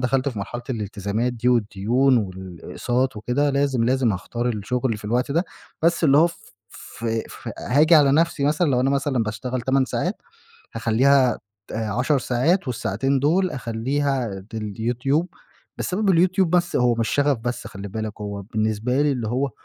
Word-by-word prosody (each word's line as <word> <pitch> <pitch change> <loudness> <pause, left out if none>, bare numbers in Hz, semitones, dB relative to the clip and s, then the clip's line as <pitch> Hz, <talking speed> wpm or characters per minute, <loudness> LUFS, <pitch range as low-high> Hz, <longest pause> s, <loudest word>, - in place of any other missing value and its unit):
دخلت 130 +2 +1
في 120 -6 -6
مرحلة 120 +5 -5
الالتزامات 105 +1 -2
دي 120 +1 -1
والدُّيون 120 +3 +2
والإقساط 100 +6 -3
وكدة، 125 +7 0
لازم، 140 -4 +1
لازم 125 -3 +2
هاختار 120 +6 -3
الشُّغل 115 +2 -1
في 105 - -14
الوقت 125 +5 0
ده، 170 +4 +1 0.4
بس 170 0 +2
اللي 140 0 +5
هو 165 - +6
ف 170 - -6 0.7
ف 115 - -7 0.3
ف - - -9
هاجي 155 +6 +4
على 140 -3 +6
نفسي 160 -2 +2
مثلًا، 150 +1 +2
لو 125 -1 +2
أنا 135 - +2
مثلًا 140 -3 +1
باشتغل 120 +4 -3
8 135 0 +2
ساعات، 180 +9 -3 0.5
هاخلِّيها 130 +1 +3 0.3
ت - - -9
10 115 +6 0
ساعات، 135 +8 +1
والساعتين 125 +4 0
دول 180 +6 +2
أخلّيها 125 -1 -2
ديل 105 -3 -4
يوتيوب، 135 +8 0 0.5
بسبب 195 +2 0
اليوتيوب 185 +1 +3
بس 175 0 +1
هو 125 -1 +3
مش 115 -1 -1
شغف 145 -2 +2
بس 120 +2 -4
خلِّ 100 +1 -8
بالك، 110 +1 -5
هو 100 -1 -5
بالنسبة 110 +5 0
لي 145 -1 +2
اللي 120 -4 -3
هو 130 +4 0
125 Hz, 165 wpm, -23 LUFS, 110-140 Hz, 0.7 s, هو